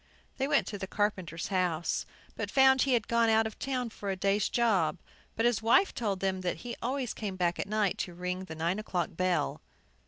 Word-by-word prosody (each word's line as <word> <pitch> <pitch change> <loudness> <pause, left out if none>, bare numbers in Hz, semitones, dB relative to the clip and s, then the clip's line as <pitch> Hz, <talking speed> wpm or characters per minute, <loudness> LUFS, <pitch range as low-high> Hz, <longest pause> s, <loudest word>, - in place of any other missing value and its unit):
They 270 - 0
went 290 -1 +3
to 205 - -6
the 190 - -4
carpenter's 185 -5 -2
house, 180 -4 0 0.3
but - - -3
found 265 -1 +5
he 270 - +3
had 225 -3 -1
gone 235 -1 +3
out 220 0 +4
of 220 - -6
town 255 -3 -2
for 200 -2 -6
a 195 - 0
day's 195 +2 +1
job. 195 -10 +2 0.4
But 225 - +1
his 240 -3 +2
wife 240 - +4
told 200 -5 -2
them 190 -1 0
that 180 -1 -2
he 240 - -4
always 255 0 -2
came 205 -3 -4
back 175 -1 0
at - - -2
night 210 -3 +1
to 175 - -4
ring 180 +1 -3
the 160 - -8
nine 170 +5 -1
o'clock 180 -5 -2
bell. 185 0 0
205 Hz, 215 wpm, -30 LUFS, 185-235 Hz, 0.4 s, found